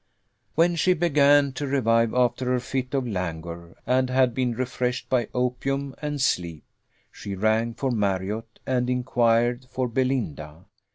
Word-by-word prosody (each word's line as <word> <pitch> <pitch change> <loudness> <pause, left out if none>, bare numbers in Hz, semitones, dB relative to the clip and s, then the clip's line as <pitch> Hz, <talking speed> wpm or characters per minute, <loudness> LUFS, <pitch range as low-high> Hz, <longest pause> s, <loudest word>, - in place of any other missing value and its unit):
When 170 +2 +3
she 185 +2 +3
began 145 -4 +4
to 140 +2 -4
revive 115 -4 +2
after 125 0 +1
her 125 - +1
fit 130 +2 -3
of 130 -2 0
languor, 85 -3 -5
and 130 0 +2
had 130 -1 +3
been 125 -1 0
refreshed 125 0 -2
by 120 -4 +2
opium 130 +2 -2
and 150 -1 -3
sleep, 85 - -1 0.5
she 100 -1 -7
rang 110 +3 +1
for 135 0 -1
Marriott, 105 +1 -2
and 125 -1 0
inquired 120 -1 +1
for 130 -1 -2
Belinda. 105 - -2
125 Hz, 140 wpm, -25 LUFS, 110-130 Hz, 0.5 s, began